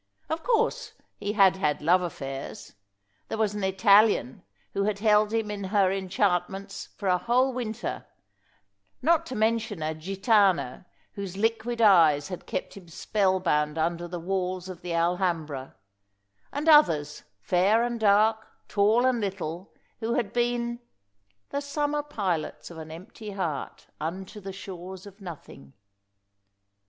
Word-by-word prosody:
Of 320 Hz, +1 st, -2 dB
course 485 Hz, +2 st, 0 dB, 0.3 s
he 205 Hz, -, -2 dB
had 195 Hz, -3 st, +5 dB
had 150 Hz, -6 st, 0 dB
love 175 Hz, +4 st, +4 dB
affairs. 135 Hz, -6 st, -6 dB, 0.5 s
There -, -, -4 dB
was 215 Hz, -2 st, +1 dB
an 205 Hz, -1 st, -4 dB
Italian 195 Hz, -, +4 dB, 0.3 s
who 200 Hz, -, 0 dB
had 210 Hz, -1 st, 0 dB
held 210 Hz, 0 st, +3 dB
him 225 Hz, -2 st, -1 dB
in 200 Hz, -1 st, -4 dB
her 195 Hz, -1 st, +3 dB
enchantments 195 Hz, 0 st, -1 dB
for 200 Hz, -, -4 dB
a 180 Hz, -1 st, +3 dB
whole 255 Hz, +4 st, +2 dB
winter, 235 Hz, -2 st, -4 dB, 1.0 s
not 330 Hz, +2 st, +3 dB
to 255 Hz, -, -5 dB
mention 220 Hz, -5 st, 0 dB
a 155 Hz, +1 st, -1 dB
gitàna, 195 Hz, -, +1 dB, 0.3 s
whose 195 Hz, -3 st, -6 dB
liquid 225 Hz, +2 st, 0 dB
eyes 160 Hz, -7 st, +5 dB
had 180 Hz, -, -7 dB
kept -, -, -4 dB
him 190 Hz, -3 st, -12 dB
spell 190 Hz, +3 st, 0 dB
bound 150 Hz, -3 st, 0 dB
under 170 Hz, +2 st, -1 dB
the 175 Hz, 0 st, -5 dB
walls 185 Hz, 0 st, -2 dB
of 185 Hz, -2 st, -8 dB
the 175 Hz, -, -5 dB
Alhambra, 170 Hz, -5 st, -1 dB, 0.8 s
and 290 Hz, +3 st, -3 dB
others, 160 Hz, -, +5 dB, 0.2 s
fair 190 Hz, -, +3 dB
and 240 Hz, -1 st, -2 dB
dark, 220 Hz, +1 st, +3 dB, 0.2 s
tall 215 Hz, +4 st, +3 dB
and 255 Hz, -2 st, +2 dB
little, 190 Hz, -2 st, -4 dB, 0.3 s
who 230 Hz, +1 st, -1 dB
had 230 Hz, -6 st, -1 dB
been 240 Hz, 0 st, 0 dB, 0.7 s
"The 280 Hz, -, -2 dB
summer 290 Hz, +1 st, -1 dB
pilots 195 Hz, -, -3 dB
of 165 Hz, -, -9 dB
an 160 Hz, 0 st, -8 dB
empty 200 Hz, +5 st, -9 dB
heart 165 Hz, -8 st, -4 dB
Unto 190 Hz, +7 st, -5 dB
the 195 Hz, -1 st, -7 dB
shores 190 Hz, -1 st, -8 dB
of 200 Hz, +1 st, -13 dB
nothing." 155 Hz, -, -10 dB
195 Hz, 145 wpm, -27 LUFS, 175-225 Hz, 1.0 s, had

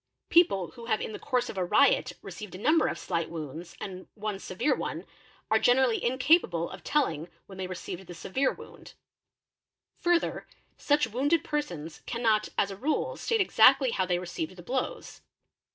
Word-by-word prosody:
People 195 Hz, -, +4 dB
who 230 Hz, +6 st, -11 dB
have 220 Hz, -, +1 dB
in -, -, -4 dB
the -, -, -7 dB
course 250 Hz, -3 st, 0 dB
of 195 Hz, -, -5 dB
a -, -, +1 dB
riot 235 Hz, +10 st, +3 dB
received 195 Hz, +1 st, -8 dB
a -, -, -6 dB
number 305 Hz, -, +3 dB
of -, -, -2 dB
slight 170 Hz, -3 st, -2 dB
wounds 165 Hz, +1 st, -7 dB
and 185 Hz, -1 st, -7 dB
one 210 Hz, -2 st, -4 dB
severe 185 Hz, +10 st, 0 dB
one, -, -, -4 dB, 0.5 s
are 220 Hz, -, +5 dB
generally 245 Hz, -1 st, +3 dB
incapable 255 Hz, -, +2 dB
of -, -, -10 dB
telling 170 Hz, -, 0 dB, 0.2 s
when 190 Hz, -1 st, -12 dB
they 185 Hz, -, -3 dB
received 180 Hz, 0 st, -7 dB
the 175 Hz, -, -9 dB
severe 260 Hz, +11 st, 0 dB
wound. -, -, -13 dB, 1.0 s
Further 345 Hz, -1 st, +1 dB, 0.3 s
such 295 Hz, 0 st, +2 dB
wounded 280 Hz, +8 st, +1 dB
persons 175 Hz, -, -4 dB
cannot 225 Hz, -3 st, +1 dB
as 200 Hz, -, +2 dB
a -, -, -6 dB
rule 305 Hz, -, -1 dB
state 455 Hz, -2 st, 0 dB
exactly 265 Hz, -5 st, +5 dB
how 190 Hz, -4 st, 0 dB
they: 180 Hz, -1 st, +1 dB
received 175 Hz, -1 st, -5 dB
the 175 Hz, -, -11 dB
blows. 255 Hz, +6 st, -4 dB
215 Hz, 170 wpm, -28 LUFS, 180-270 Hz, 1.0 s, are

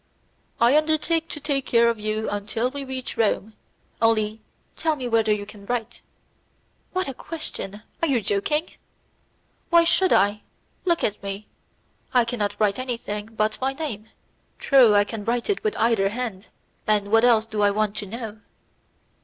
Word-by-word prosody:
"I 235 Hz, +4 st, +5 dB
undertake 315 Hz, +2 st, +2 dB
to 300 Hz, -, -6 dB
take 275 Hz, -2 st, -1 dB
care 235 Hz, 0 st, +4 dB
of 230 Hz, -2 st, 0 dB
you 215 Hz, +1 st, -2 dB
until 215 Hz, +4 st, -2 dB
we 280 Hz, 0 st, -5 dB
reach 260 Hz, -1 st, -6 dB
Rome; 220 Hz, -1 st, +1 dB, 0.5 s
only 220 Hz, -1 st, +2 dB, 0.3 s
tell 320 Hz, -1 st, 0 dB
me 255 Hz, -4 st, -4 dB
whether 225 Hz, -2 st, +2 dB
you 205 Hz, -1 st, 0 dB
can 205 Hz, -1 st, -13 dB
write." 240 Hz, -3 st, -3 dB, 0.9 s
"What 370 Hz, -2 st, -1 dB
a 270 Hz, -, -4 dB
question! 230 Hz, -, -6 dB, 0.2 s
Are 330 Hz, -, +2 dB
you 270 Hz, -5 st, +2 dB
joking?" 230 Hz, -, 0 dB, 1.0 s
"Why 340 Hz, 0 st, +6 dB
should 375 Hz, +2 st, +3 dB
I? 205 Hz, +2 st, +3 dB, 0.4 s
Look 340 Hz, -2 st, +1 dB
at 210 Hz, -1 st, -1 dB
me; 200 Hz, +1 st, -5 dB, 0.7 s
I 245 Hz, -2 st, +5 dB
cannot 230 Hz, -4 st, -2 dB
write 210 Hz, +1 st, +2 dB
anything 230 Hz, -5 st, -4 dB
but 215 Hz, 0 st, -1 dB
my 265 Hz, +1 st, 0 dB
name. 230 Hz, -8 st, -5 dB, 0.5 s
True, 250 Hz, -7 st, +5 dB
I 205 Hz, -, +6 dB
can 210 Hz, 0 st, -6 dB
write 235 Hz, -, 0 dB
it 395 Hz, -, -3 dB
with 430 Hz, -, -1 dB
either 220 Hz, -4 st, +3 dB
hand; 220 Hz, -3 st, -4 dB, 0.4 s
and 205 Hz, -1 st, +1 dB
what 225 Hz, +1 st, +5 dB
else 230 Hz, -3 st, +5 dB
do 215 Hz, -2 st, -3 dB
I 205 Hz, -, +5 dB
want 210 Hz, 0 st, 0 dB
to 205 Hz, -, -2 dB
know?" 220 Hz, 0 st, -7 dB
225 Hz, 165 wpm, -24 LUFS, 210-265 Hz, 1.0 s, Why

